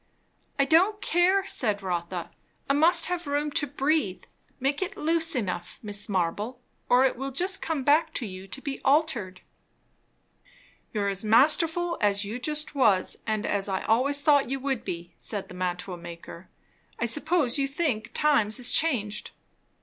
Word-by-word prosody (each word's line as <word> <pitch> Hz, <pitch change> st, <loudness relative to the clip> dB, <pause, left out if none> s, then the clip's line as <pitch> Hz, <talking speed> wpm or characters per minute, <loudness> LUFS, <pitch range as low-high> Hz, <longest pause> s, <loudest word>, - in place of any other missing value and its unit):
"I 275 Hz, -, +3 dB
don't 370 Hz, +8 st, +3 dB
care," 375 Hz, +1 st, +2 dB
said 210 Hz, -, -1 dB
Rotha. 175 Hz, -1 st, -3 dB, 0.4 s
"I 275 Hz, -, +2 dB
must 330 Hz, +3 st, +5 dB
have 350 Hz, -3 st, -3 dB
room 290 Hz, +1 st, -1 dB
to 290 Hz, -, 0 dB
breathe. 270 Hz, -, 0 dB, 0.4 s
Make 275 Hz, +4 st, -1 dB
it 375 Hz, -, -3 dB
loose 330 Hz, 0 st, +1 dB
enough, 180 Hz, -7 st, -3 dB
Mrs. 205 Hz, 0 st, +1 dB
Marble, 205 Hz, +6 st, -2 dB, 0.3 s
or 250 Hz, +2 st, +5 dB
it 265 Hz, -, +1 dB
will 270 Hz, +2 st, -4 dB
just 370 Hz, +8 st, -1 dB
come 315 Hz, -5 st, -2 dB
back 295 Hz, +4 st, +3 dB
to 245 Hz, -, -2 dB
you 190 Hz, -1 st, -9 dB
to 265 Hz, +8 st, -7 dB
be 280 Hz, -2 st, -5 dB
altered." 265 Hz, -, +1 dB, 1.5 s
"You're 205 Hz, -2 st, -1 dB
as 195 Hz, +1 st, -2 dB
masterful 320 Hz, +9 st, +3 dB
as 200 Hz, -1 st, +1 dB
you 220 Hz, +5 st, -5 dB
just 300 Hz, +3 st, -2 dB
was, 210 Hz, -10 st, +2 dB
and 215 Hz, -1 st, -1 dB
as 200 Hz, -1 st, 0 dB
I 190 Hz, -1 st, -2 dB
always 280 Hz, +5 st, +1 dB
thought 285 Hz, -4 st, +4 dB
you 270 Hz, +1 st, -2 dB
would 265 Hz, -3 st, -2 dB
be," 170 Hz, 0 st, -6 dB
said 205 Hz, -3 st, -4 dB
the -, -, -9 dB
mantua 180 Hz, 0 st, -4 dB
maker. 170 Hz, +1 st, -11 dB, 0.5 s
"I 235 Hz, -, -1 dB
suppose 290 Hz, +2 st, +2 dB
you 275 Hz, -, +1 dB
think 275 Hz, -7 st, -2 dB
times 265 Hz, -8 st, +2 dB
is 250 Hz, -, +1 dB
changed." 215 Hz, -10 st, 0 dB
260 Hz, 165 wpm, -26 LUFS, 200-300 Hz, 1.5 s, must